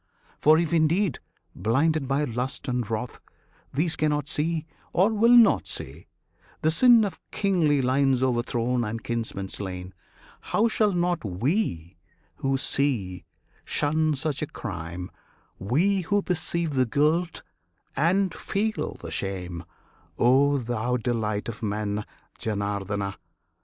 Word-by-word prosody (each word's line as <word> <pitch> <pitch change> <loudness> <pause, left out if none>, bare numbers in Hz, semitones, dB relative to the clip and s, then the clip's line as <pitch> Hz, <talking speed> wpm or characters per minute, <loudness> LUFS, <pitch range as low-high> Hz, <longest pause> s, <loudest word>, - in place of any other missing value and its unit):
For 155 +1 +6
if 170 0 0
indeed, 165 - +2 0.4
blinded 140 - +1
by 140 +2 +1
lust 125 0 -3
and 125 -3 -1
wrath, 115 +1 -4 0.5
These 160 +4 +1
cannot 150 -2 0
see, 160 +1 -1 0.3
or 195 +5 +4
will 225 +2 +4
not 235 - +5
see, - - -5 0.6
the 155 - +4
sin 235 +4 +6
Of 200 - -5
kingly 165 -9 +2
lines 130 0 +2
o'erthrown 120 -1 0
and 115 +1 -4
kinsmen 115 -4 -3
slain, 95 -2 -5 0.5
How 225 +2 +1
should 215 -3 +1
not 175 -1 0
we, 95 - -1 0.4
who 135 0 0
see, 120 -10 0 0.4
shun 155 +1 +1
such 150 0 -3
a 155 - -1
crime 90 -5 -6 0.5
We 175 - +1
who 200 +3 0
perceive 170 -2 -2
the 130 -2 +2
guilt 155 +7 +1 0.5
and 185 +4 +2
feel 215 +2 -2
the - - -9
shame 90 -3 -4 0.5
O 140 +4 +4
thou 120 0 -1
Delight 110 -3 -2
of 115 -1 -6
Men, 105 0 -2 0.3
Janardana? 100 -2 -2
135 Hz, 125 wpm, -26 LUFS, 110-165 Hz, 0.6 s, For